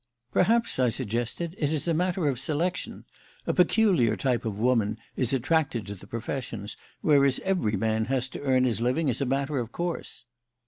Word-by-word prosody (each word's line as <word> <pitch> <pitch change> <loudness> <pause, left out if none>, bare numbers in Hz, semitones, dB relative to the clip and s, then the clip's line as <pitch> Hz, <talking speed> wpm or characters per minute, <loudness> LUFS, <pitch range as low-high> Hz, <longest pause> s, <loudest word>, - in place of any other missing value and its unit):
"Perhaps," 230 - +2
I 125 -1 +4
suggested, 120 - -3
"it 145 -2 +1
is 155 +1 0
a 165 - +2
matter 180 0 0
of 130 -4 0
selection. 160 +6 -2 0.4
A - - 0
peculiar 180 - +3
type 125 -4 0
of 105 -3 -3
woman 110 -2 +1 0.2
is 125 -3 0
attracted 135 -3 +1
to 100 - -5
the 95 - -13
professions, 115 -3 -5 0.3
whereas 140 -3 +4
every 180 - 0
man 110 +1 0
has 130 0 0
to - - -8
earn 130 -2 +3
his 120 -3 0
living 130 +4 +1
as 120 - -2
a 135 - 0
matter 140 +2 0
of 120 -1 -4
course." 170 -7 -4
130 Hz, 180 wpm, -27 LUFS, 115-160 Hz, 0.4 s, I